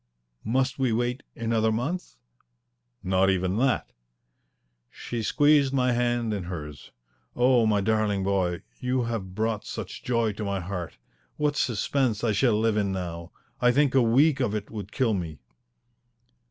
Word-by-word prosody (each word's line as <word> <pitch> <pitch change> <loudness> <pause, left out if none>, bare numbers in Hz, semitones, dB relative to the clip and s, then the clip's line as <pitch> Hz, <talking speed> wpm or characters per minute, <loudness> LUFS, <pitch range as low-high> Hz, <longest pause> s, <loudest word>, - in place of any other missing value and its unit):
"Must 130 +4 0
we 130 -3 +2
wait 120 +3 -1
another 115 -1 +1
month?" 145 +12 -3 0.9
"Not 95 +1 +2
even 95 +1 0
that." 130 0 +1 1.0
She 120 - -5
squeezed 145 +3 +3
my 125 -2 +2
hand 120 -2 0
in 100 -4 -3
hers. 75 -5 -7 0.5
"Oh, 125 -2 +4
my 105 -2 +2
darling 105 -1 +1
boy, 95 -3 0 0.2
you 125 0 0
have 105 -6 -4
brought 110 0 -1
such - - -7
joy 115 -3 +1
to 105 - -6
my 100 -1 -1
heart! 90 -2 -5 0.4
What 150 -1 +1
suspense 120 -2 0
I 115 - +2
shall 105 +1 +2
live 110 -1 +1
in 100 -2 +1
now! 85 -3 -5 0.3
I 125 - +5
think 140 +1 +2
a 135 - +5
week 130 +6 +4
of 115 -5 0
it 105 -1 -5
would 105 -2 -7
kill 125 -5 +1
me." 85 -6 -4
110 Hz, 155 wpm, -26 LUFS, 100-125 Hz, 1.0 s, I